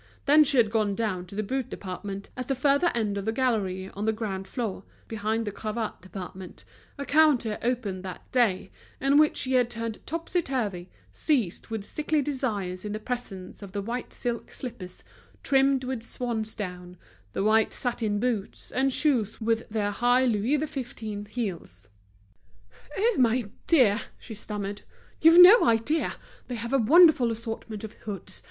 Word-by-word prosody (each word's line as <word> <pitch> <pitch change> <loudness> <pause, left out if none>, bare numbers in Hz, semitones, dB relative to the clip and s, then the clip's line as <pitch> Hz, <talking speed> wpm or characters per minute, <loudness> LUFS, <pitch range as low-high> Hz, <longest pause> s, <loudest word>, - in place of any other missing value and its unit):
Then 305 +1 +7
she 280 -2 +2
had 225 -4 +4
gone 215 -3 +1
down 190 -5 -2
to 195 - -10
the 215 - -1
boot 260 +4 -3
department, 195 +1 -6
at 255 -1 -5
the 270 - 0
further 280 +6 +3
end 210 -3 -1
of 200 - -6
a - - +2
gallery 205 -7 -1
on 205 +2 -4
the 220 - +3
ground 200 -4 -4
floor, 210 -4 -4 0.2
behind 220 +1 -2
the 205 - -3
cravat 215 +2 -4
department, 185 0 -9 0.3
a 280 - -4
counter 280 -8 +3
opened 225 -6 -2
that 185 -1 -9
day, 225 -7 +1 0.3
and 275 +2 +4
which 305 0 +4
she 260 -1 0
had 250 -2 +3
turned 230 -2 -5
topsy 335 +3 -1
turvy, 210 - -3 0.2
seized 245 - 0
with 225 -2 -4
sickly 305 +7 -1
desires 220 -10 -2
in 210 -1 -4
the 215 - -3
presence 215 -6 -6
of 195 -2 -10
the 200 - -2
white 235 +4 -4
silk 240 -1 -4
slippers 215 -8 -7 0.4
trimmed 270 -1 +3
with 255 -2 -3
swansdown, 215 -7 -4 0.4
the - - -1
white 220 +1 +3
satin 230 -4 -1
boots 225 -4 -3
and 270 +1 +1
shoes 250 -7 +1
with 230 +1 -1
their 210 -2 -1
high 245 +4 +3
Louis 235 +4 +1
XV. 240 -8 -5
heels. 170 - -5 1.1
"Oh! 455 +3 +2
my 235 -3 +2 0.2
dear," 235 -10 +4 0.2
she 230 - -10
stammered, 205 -1 -5 0.4
"you've 330 +2 +8
no 390 +7 +10
idea! 230 +8 +1 0.3
They 250 - -4
have 235 +3 -5
a 275 - +4
wonderful 295 0 +6
assortment 225 -1 -5
of 220 - -7
hoods. 195 -3 -6
225 Hz, 165 wpm, -27 LUFS, 205-260 Hz, 1.1 s, no